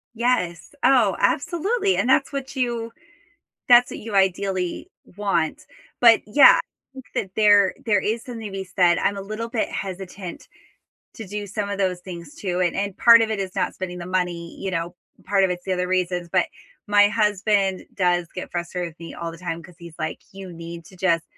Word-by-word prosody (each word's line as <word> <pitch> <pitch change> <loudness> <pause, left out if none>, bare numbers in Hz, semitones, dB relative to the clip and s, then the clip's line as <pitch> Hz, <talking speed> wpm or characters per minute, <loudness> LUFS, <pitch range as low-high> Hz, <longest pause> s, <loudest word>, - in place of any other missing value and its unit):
Yes, 180 -8 -1
oh, 240 -8 +4
absolutely, 385 - +1
and 245 - 0
that's 275 +2 +3
what 275 0 -5
you 235 -3 -2 0.8
that's 245 0 +7
what - - -7
you 220 -1 -7
ideally 190 -1 0 0.3
want, 195 -6 -1 0.4
but 230 -2 +7
yeah, 270 +7 +7 0.3
think 265 -2 -11
that 190 - -2
there 205 -3 +5
there 210 -3 +3
is 225 +2 -2
something 230 -3 -7
to 200 - -7
be 195 0 -4
said 180 -2 +3
I'm 200 - 0
a - - -4
little 215 +4 -5
bit 230 -2 -1
hesitant 190 -1 -7 0.7
to 220 - -8
do 205 +2 -5
some 205 +1 -3
of 200 - -3
those 185 -2 -1
things 170 -4 -9
too, 180 -2 -3
and 175 -2 +1
and 200 -1 -2
part 230 -1 +8
of 225 - +2
it 215 - -1
is 190 -2 -4
not - - -1
spending 180 -1 -6
the 175 - -7
money, 180 -2 -2
you 195 - -3
know, 170 0 -3 0.3
part 195 -1 +3
of 190 - +1
it's 175 0 -4
the 190 - 0
other 180 0 -2
reasons, 180 -1 -1
but - - +3 0.4
my 205 0 +6
husband 205 -3 +1
does 180 -2 +1
get 185 - -6
frustrated 175 0 -3
with 160 - -32
me 165 - -8
all 170 0 -5
the 165 - -11
time 170 -1 -5
'cause 180 -2 -15
he's 170 -2 -11
like, 155 -1 -4
"You 190 -2 -9
need 170 0 -9
to 185 - -16
just 170 -2 +1
190 Hz, 200 wpm, -23 LUFS, 180-215 Hz, 0.8 s, part